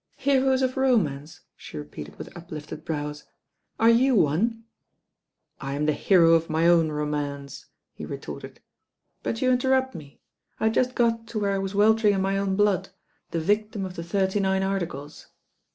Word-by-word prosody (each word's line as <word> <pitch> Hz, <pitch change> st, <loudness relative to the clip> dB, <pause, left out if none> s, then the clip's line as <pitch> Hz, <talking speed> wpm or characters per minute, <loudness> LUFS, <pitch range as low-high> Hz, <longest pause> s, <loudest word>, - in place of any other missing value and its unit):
"Heroes 265 Hz, -1 st, +2 dB
of 255 Hz, +1 st, -1 dB
romance 175 Hz, -, 0 dB
I" -, -, -39 dB
she -, -, -10 dB
repeated 150 Hz, 0 st, -8 dB
with -, -, -10 dB
uplifted 155 Hz, -3 st, -8 dB
brows. 150 Hz, -2 st, -4 dB, 0.5 s
"Are 225 Hz, +1 st, +6 dB
you 255 Hz, +3 st, +4 dB
one?" 215 Hz, +7 st, +1 dB, 1.0 s
"I 135 Hz, 0 st, -4 dB
am 150 Hz, +1 st, -1 dB
the 155 Hz, -, +2 dB
hero 165 Hz, 0 st, +4 dB
of 165 Hz, 0 st, +2 dB
my 160 Hz, +1 st, +1 dB
own 165 Hz, -2 st, +4 dB
romance," 145 Hz, -2 st, -4 dB, 0.3 s
he -, -, -10 dB
retorted; -, -, -8 dB, 0.6 s
"but 230 Hz, +3 st, -3 dB
you 255 Hz, -, +3 dB
interrupt 260 Hz, +1 st, +2 dB
me. 145 Hz, -3 st, -11 dB, 0.4 s
I -, -, -4 dB
had 220 Hz, 0 st, +3 dB
just 255 Hz, +2 st, +1 dB
got 230 Hz, -1 st, +1 dB
to 225 Hz, -2 st, -3 dB
where 200 Hz, -1 st, 0 dB
I 195 Hz, -, 0 dB
was 195 Hz, +1 st, -4 dB
weltering 210 Hz, 0 st, +4 dB
in 190 Hz, -, 0 dB
my 195 Hz, +1 st, 0 dB
own 195 Hz, -1 st, 0 dB
blood 195 Hz, -2 st, +1 dB, 0.2 s
— -, -, -44 dB
^the 165 Hz, -, -1 dB
victim 210 Hz, +3 st, 0 dB
of 185 Hz, -1 st, -7 dB
the 170 Hz, -, -5 dB
Thirty 190 Hz, +3 st, 0 dB
Nine 190 Hz, -1 st, +1 dB
Articles." 170 Hz, -7 st, -4 dB
195 Hz, 180 wpm, -25 LUFS, 155-225 Hz, 1.0 s, Are